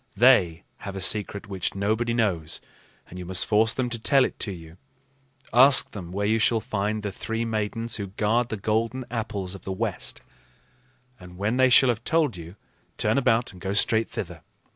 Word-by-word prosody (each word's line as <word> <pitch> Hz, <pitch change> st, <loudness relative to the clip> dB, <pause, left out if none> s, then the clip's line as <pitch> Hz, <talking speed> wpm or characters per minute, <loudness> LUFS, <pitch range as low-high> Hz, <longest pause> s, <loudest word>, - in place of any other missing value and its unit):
They 95 Hz, -9 st, +4 dB
have 100 Hz, -1 st, -7 dB
a -, -, -4 dB
secret 100 Hz, +2 st, 0 dB
which 95 Hz, -2 st, -3 dB
nobody 110 Hz, +4 st, 0 dB
knows, 90 Hz, -10 st, -1 dB, 0.5 s
and 90 Hz, -, -10 dB
you 90 Hz, -, -7 dB
must 95 Hz, -1 st, +1 dB
force 110 Hz, +1 st, +3 dB
them 130 Hz, 0 st, -1 dB
to 115 Hz, -, -1 dB
tell 135 Hz, +3 st, +3 dB
it -, -, -6 dB
to 105 Hz, -, 0 dB
you. 85 Hz, -2 st, -11 dB, 0.8 s
Ask 130 Hz, +2 st, +6 dB
them 90 Hz, -5 st, -8 dB
where 100 Hz, +2 st, -2 dB
you 110 Hz, +2 st, +2 dB
shall 115 Hz, +1 st, +3 dB
find 105 Hz, 0 st, -2 dB
the 100 Hz, -, -3 dB
three 115 Hz, +4 st, -3 dB
Maidens 115 Hz, +1 st, -2 dB
who 100 Hz, -2 st, -4 dB
guard 110 Hz, +5 st, 0 dB
the 110 Hz, -, -3 dB
golden 115 Hz, +5 st, -1 dB
apples 100 Hz, -5 st, -3 dB
of 95 Hz, -, -10 dB
the 95 Hz, -, -6 dB
West; 95 Hz, -, -3 dB, 1.0 s
and 90 Hz, -1 st, -13 dB
when 105 Hz, +5 st, -1 dB
they 130 Hz, 0 st, +5 dB
shall 130 Hz, +1 st, +6 dB
have 115 Hz, -1 st, -1 dB
told 155 Hz, -, +1 dB
you, 85 Hz, +1 st, -10 dB, 0.4 s
turn -, -, +2 dB
about 120 Hz, -2 st, +1 dB
and 90 Hz, -3 st, -15 dB
go 95 Hz, +2 st, -2 dB
straight 110 Hz, +2 st, +2 dB
thither. -, -, -6 dB
110 Hz, 190 wpm, -25 LUFS, 95-115 Hz, 1.0 s, Ask